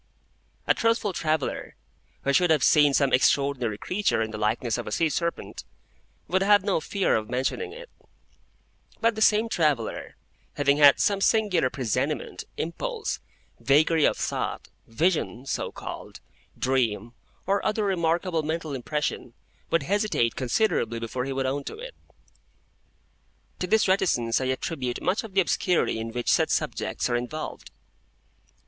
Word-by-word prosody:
A - - +4
truthful 230 -3 +1
traveller, 155 -4 -2 0.5
who 140 - +1
should 180 +3 +4
have 155 -4 +3
seen 150 -2 +5
some 140 -2 +2
extraordinary 130 -4 +2
creature 195 - 0
in 110 - -5
the 110 - -5
likeness 110 +2 0
of - - -6
a - - -4
sea 165 +7 +1
serpent, 170 +2 -3 0.6
would 185 +2 +1
have 205 0 +5
no 195 -4 +1
fear 195 +5 0
of 110 0 -2
mentioning 130 - -2
it; - - -10 1.1
but 230 0 +2
the 220 - -6
same 220 +1 +4
traveller, 150 - -1 0.4
having 140 0 +2
had 145 -1 +7
some 200 -1 +1
singular 195 - +2
presentiment, 130 +4 -2
impulse, 435 - -3 0.4
vagary 155 +3 +3
of - - +3
thought, - - -3 0.2
vision 135 -1 0
(so - - -3
called), - - -8 0.4
dream, 120 -4 0 0.3
or 200 +1 +1
other 215 0 0
remarkable 170 -2 0
mental 155 0 -3
impression, 135 -2 -3 0.3
would 165 -3 +1
hesitate 200 - 0
considerably 130 - 0
before 115 +2 -3
he 135 - -4
would 135 0 -1
own 140 +2 -1
to - - -6
it. - - -8 1.7
To 180 - -2
this 220 +3 +3
reticence 135 - +1
I - - -1
attribute 130 -1 -2
much 190 +6 0
of 210 -4 -10
the 195 - +6
obscurity 175 -8 +1
in 115 0 -4
which 120 +1 -1
such - - +3
subjects - - -1
are 120 - 0
involved. 125 +6 -5
155 Hz, 145 wpm, -26 LUFS, 130-190 Hz, 1.7 s, had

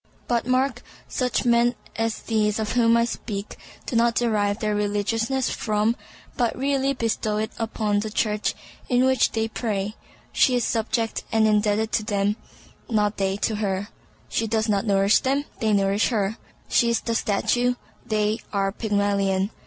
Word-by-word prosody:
But 235 -1 0
mark, 255 +1 +1 0.3
such 250 0 -1
men 240 0 +3 0.2
as 225 -1 -2
these 215 -2 +1
of 220 -1 -2
whom 235 -1 +4
I 235 - +3
speak 210 -3 -5 0.3
do - - -4
not 230 0 +3
derive 210 -4 +1
their 215 -2 -1
religiousness 220 +5 0
from, 215 +1 0 0.4
but 240 -3 0
really 275 0 +1
bestow 225 -3 -1
it 220 +1 -2
upon 215 -2 0
the 215 +1 -3
Church 210 0 0 0.3
in 250 0 +3
which 260 0 +3
they 225 0 0
pray. 210 -3 -2 0.4
She 255 - +3
is 245 - +1
subject 225 0 -1
and 220 -1 +3
indebted 215 +1 +2
to 215 - +1
them, 205 -1 0 0.5
not 210 -2 +1
they 195 0 0
to 220 - -1
her. 200 -1 -2 0.4
She 225 - -1
does 220 0 0
not 205 0 0
nourish 195 0 +4
them, 275 +2 0
they 220 -1 +1
nourish 200 +1 +2
her. 215 -3 -1 0.3
She 235 - +3
is 235 - +1
the 230 - -2
statue, 245 +4 +1 0.3
they 215 0 0
are 195 -1 0
Pygmalion. 200 -2 0
220 Hz, 160 wpm, -24 LUFS, 205-235 Hz, 0.5 s, whom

